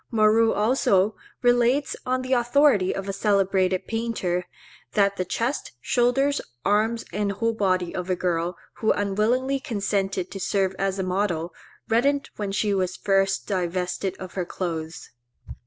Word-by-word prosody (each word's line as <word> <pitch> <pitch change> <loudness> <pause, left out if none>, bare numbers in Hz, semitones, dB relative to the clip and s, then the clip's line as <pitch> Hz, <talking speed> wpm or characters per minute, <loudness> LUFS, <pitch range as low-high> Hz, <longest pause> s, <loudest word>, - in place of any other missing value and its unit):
Moreau 225 0 +4
also 210 -2 +2 0.3
relates, 245 +3 +3
on 255 0 0
the 255 +1 -1
authority 240 -5 +3
of 195 0 -4
a 195 - -2
celebrated 195 -2 +1
painter, 225 -6 -2 0.5
that 200 -1 +3
the 185 - -1
chest, 235 +9 -2
shoulders, 250 - +2 0.2
arms, 220 +3 +1
and 200 +1 0
whole 230 +3 0
body 185 -5 0
of 180 0 -4
a 185 - +2
girl, 175 -1 -1 0.2
who 220 - +2
unwillingly 230 +7 +1
consented 200 -7 -2
to 195 - -6
serve 195 0 0
as 195 0 0
a 190 - -1
model, 180 -3 -1 0.3
reddened 275 +5 +1
when 205 -2 -3
she 205 +1 0
was 185 -1 -1
first 195 -1 +1
divested 180 0 -2
of 185 -1 -8
her 185 - -1
clothes. 165 -2 -5
200 Hz, 145 wpm, -25 LUFS, 185-230 Hz, 0.5 s, Moreau